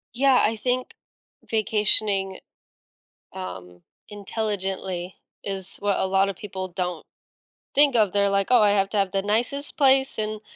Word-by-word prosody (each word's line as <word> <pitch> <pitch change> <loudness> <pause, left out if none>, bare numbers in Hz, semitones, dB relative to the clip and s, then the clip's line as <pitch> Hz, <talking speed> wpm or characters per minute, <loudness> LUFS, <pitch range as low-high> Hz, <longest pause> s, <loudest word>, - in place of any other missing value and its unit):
Yeah, 265 0 +4
I 225 - +1
think 250 +3 -2 0.6
vacationing, 210 -3 +1 0.9
um, 90 -1 -8 0.3
intelligently 195 -3 -4 0.3
is 195 -1 -6
what 205 -1 0
a - - +1
lotta 195 +1 +2
people 190 -2 -6
don't 180 -2 -4 0.7
think 285 -2 +4
of, 215 -4 +4
they're 200 0 +2
like, 200 0 +1
"Oh, 245 -2 +6
I 205 -1 +5
have 195 -1 +2
to 210 - -2
have 195 -2 +1
the 195 - +1
nicest 240 +10 -2
place 270 -2 +3
and 215 0 -3
200 Hz, 140 wpm, -24 LUFS, 190-220 Hz, 0.9 s, Oh